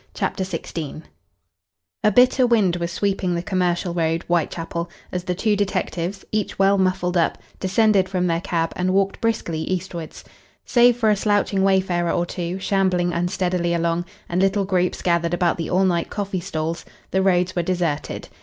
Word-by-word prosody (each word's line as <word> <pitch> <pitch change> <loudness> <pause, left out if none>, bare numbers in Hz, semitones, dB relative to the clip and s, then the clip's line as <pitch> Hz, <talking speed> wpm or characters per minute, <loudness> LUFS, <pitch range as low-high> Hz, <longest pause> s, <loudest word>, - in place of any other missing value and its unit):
CHAPTER 190 - -1
XVI 165 -4 -5 1.0
A 215 - +5
bitter 250 +3 +5
wind 205 -7 +3
was 170 0 -3
sweeping 190 -1 0
the 170 - -2
Commercial 180 -1 0
Road, 165 -1 0
Whitechapel, 170 0 -2 0.2
as 180 0 -3
the 180 - -1
two 210 +3 +1
detectives, 195 -2 -2
each 215 -2 -2
well 195 0 +4
muffled 185 -1 +1
up, 165 - +2 0.2
descended 195 0 +3
from 180 -1 0
their 170 -1 0
cab 165 -2 -1
and 185 +1 0
walked 195 0 +1
briskly 220 -8 -1
eastwards. 175 -2 -4 0.4
Save 240 -1 +5
for 220 -3 +3
a - - +4
slouching 205 -1 +1
wayfarer 185 -3 +2
or 175 - 0
two, 175 +1 -4
shambling 185 -2 +1
unsteadily 175 0 0
along, 170 +1 0 0.2
and 175 +2 0
little 195 +1 +2
groups 180 -2 0
gathered 170 -1 +1
about 175 -1 +1
the 165 - -3
all 190 +2 +3
night 170 -2 0
coffee 200 -2 -3
stalls, 165 -2 -3 0.3
the 190 - +2
roads 185 -1 +2
were 175 - +2
deserted. 170 -4 -2
180 Hz, 165 wpm, -22 LUFS, 170-195 Hz, 1.0 s, A